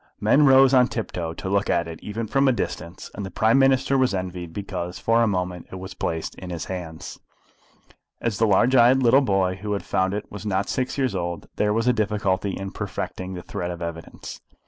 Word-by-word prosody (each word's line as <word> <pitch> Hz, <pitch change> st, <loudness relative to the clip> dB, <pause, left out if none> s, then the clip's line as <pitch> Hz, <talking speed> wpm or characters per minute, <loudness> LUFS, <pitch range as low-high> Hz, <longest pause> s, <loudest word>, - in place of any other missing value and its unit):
Men 145 Hz, 0 st, +4 dB
rose 135 Hz, 0 st, +6 dB
on 125 Hz, -1 st, +6 dB
tiptoe 85 Hz, -9 st, -4 dB
to -, -, -6 dB
look 100 Hz, +1 st, +1 dB
at 85 Hz, 0 st, +1 dB
it 80 Hz, -1 st, -8 dB
even 110 Hz, +2 st, -4 dB
from 135 Hz, +5 st, +2 dB
a -, -, +5 dB
distance, 90 Hz, -7 st, -5 dB
and 100 Hz, -, -6 dB
the 95 Hz, -, -5 dB
Prime 110 Hz, +7 st, +3 dB
Minister 135 Hz, 0 st, +3 dB
was 130 Hz, -6 st, +2 dB
envied 90 Hz, -2 st, -5 dB
because 90 Hz, -2 st, -5 dB
for 115 Hz, +1 st, +2 dB
a 115 Hz, -, +3 dB
moment 90 Hz, -3 st, -2 dB
it -, -, -7 dB
was 95 Hz, 0 st, -7 dB
placed 80 Hz, -3 st, -3 dB
in 90 Hz, -, -8 dB
his 85 Hz, -2 st, -4 dB
hands. 85 Hz, -4 st, -7 dB, 1.0 s
As 115 Hz, -3 st, -2 dB
the 110 Hz, -, +4 dB
large 115 Hz, +6 st, +4 dB
eyed 130 Hz, +2 st, +5 dB
little 125 Hz, +3 st, +6 dB
boy 95 Hz, -6 st, +1 dB
who 105 Hz, +1 st, -3 dB
had 100 Hz, -, -3 dB
found 95 Hz, +1 st, 0 dB
it 105 Hz, -, -4 dB
was 105 Hz, -1 st, -7 dB
not 100 Hz, -2 st, 0 dB
yet -, -, -10 dB
six 130 Hz, +1 st, -2 dB
years 130 Hz, -5 st, 0 dB
old, 85 Hz, -3 st, -4 dB
there 105 Hz, 0 st, +2 dB
was 115 Hz, +3 st, 0 dB
a 125 Hz, -, +5 dB
difficulty 100 Hz, -3 st, -1 dB
in 95 Hz, 0 st, -5 dB
perfecting 95 Hz, 0 st, -5 dB
the 90 Hz, -, -7 dB
thread 85 Hz, -, -4 dB
of 90 Hz, -, -5 dB
the 85 Hz, -, -4 dB
evidence. 85 Hz, -1 st, -8 dB
100 Hz, 225 wpm, -24 LUFS, 90-115 Hz, 1.0 s, rose